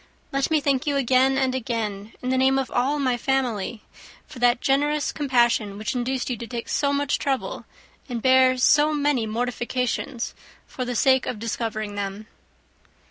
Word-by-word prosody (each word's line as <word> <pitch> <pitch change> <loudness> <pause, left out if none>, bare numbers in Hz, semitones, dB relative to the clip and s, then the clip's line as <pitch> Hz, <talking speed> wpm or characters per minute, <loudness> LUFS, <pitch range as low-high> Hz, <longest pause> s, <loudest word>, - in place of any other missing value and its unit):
Let 275 0 0
me 315 -1 +3
thank 280 +1 0
you 285 - +1
again 265 0 +3
and 265 -1 +1
again, 220 -4 -3
in 250 - -2
the 260 - +2
name 265 +1 +3
of 265 -2 -2
all 265 +4 +1
my 255 -4 +1
family, 240 -4 -1 0.4
for 255 - -12
that 245 0 +3
generous 290 +3 +1
compassion 235 -7 +1
which 215 +5 -3
induced 250 +1 -2
you 250 - -2
to 235 - -7
take 235 +1 -6
so 280 -1 +1
much 285 0 0
trouble, 270 -2 -2 0.4
and 240 -2 -3
bear 260 +1 +4
so 295 +4 +4
many 285 -6 +1
mortifications, 245 +1 -2 0.3
for 255 - -5
the 245 0 -3
sake 260 +2 +3
of 245 - -3
discovering 220 -1 -3
them." 200 +1 -5
255 Hz, 170 wpm, -24 LUFS, 235-270 Hz, 0.4 s, bear